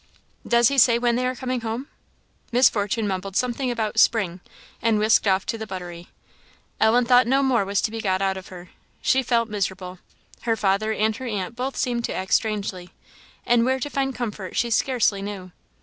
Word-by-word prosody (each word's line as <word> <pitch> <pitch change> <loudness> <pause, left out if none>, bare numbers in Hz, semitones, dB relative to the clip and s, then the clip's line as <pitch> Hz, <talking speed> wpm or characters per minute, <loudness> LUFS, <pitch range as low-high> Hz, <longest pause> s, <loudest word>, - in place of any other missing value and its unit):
"Does 235 -1 +4
he 275 -1 +2
say 235 -1 +6
when 240 0 +1
they 250 +1 0
are 255 - -2
coming 255 -1 -3
home?" 230 +4 -4 0.6
Miss 250 +2 +5
Fortune 210 +1 -1
mumbled 190 0 -4
something 250 +2 0
about 220 -2 -1
"spring," 195 -7 +2 0.4
and 225 -2 +2
whisked 215 0 +3
off 190 0 +2
to 225 - -3
the 220 - -6
buttery; 175 -3 -8 0.7
Ellen 235 +3 +4
thought 245 0 +5
no 270 +2 +3
more 250 -6 +2
was 200 0 0
to 215 - 0
be 225 0 -5
got 190 -3 0
out 195 0 0
of 190 -1 -9
her. 180 -1 -12 0.3
She 265 - +3
felt 235 -2 +1
miserable. 185 -3 -4 0.4
Her 230 -1 0
father 205 +1 0
and 220 0 0
her 260 - -6
aunt 205 -1 -4
both 260 +2 -4
seemed 240 -2 -1
to - - -4
act 190 0 -3
strangely; 200 -5 -1 0.6
and 240 -1 +3
where 260 +2 +1
to 290 +3 -4
find 270 -1 -1
comfort 210 -6 -5
she 235 -1 0
scarcely 230 -4 +1
knew. 195 -2 -7
220 Hz, 195 wpm, -23 LUFS, 195-245 Hz, 0.7 s, say